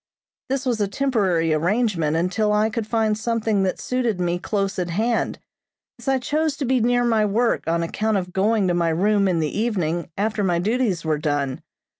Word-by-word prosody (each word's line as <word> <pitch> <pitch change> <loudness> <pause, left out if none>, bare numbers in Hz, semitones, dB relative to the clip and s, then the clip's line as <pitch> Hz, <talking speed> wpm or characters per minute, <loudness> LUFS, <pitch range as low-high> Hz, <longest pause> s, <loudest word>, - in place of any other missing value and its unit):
This 270 0 -1
was 240 -4 0
a 205 - +2
temporary 195 - +1
arrangement 170 -2 +1
until 195 +5 +1
I 210 +1 +2
could 225 -1 -3
find 220 -1 +1
something 220 -2 0
that 190 -1 -1
suited 245 -6 -1
me 175 0 0
close 195 0 -2
at 180 -1 -2
hand, 225 +7 0 0.6
as - - -13
I 270 0 +3
chose 300 +3 -1
to 285 - -2
be 255 +1 +2
near 245 +1 +2
my 225 -3 +2
work 225 +1 +1
on 170 +1 +1
account 215 +5 0
of 180 -1 -4
going 205 +1 +2
to 175 - +1
my 170 -1 +1
room 200 +4 +2
in 175 -3 +1
the 150 - -2
evening 180 -7 -1
after 210 +1 0
my 175 -3 +1
duties 200 -2 0
were 155 -1 0
done. 145 -3 -1
210 Hz, 195 wpm, -22 LUFS, 175-230 Hz, 0.6 s, I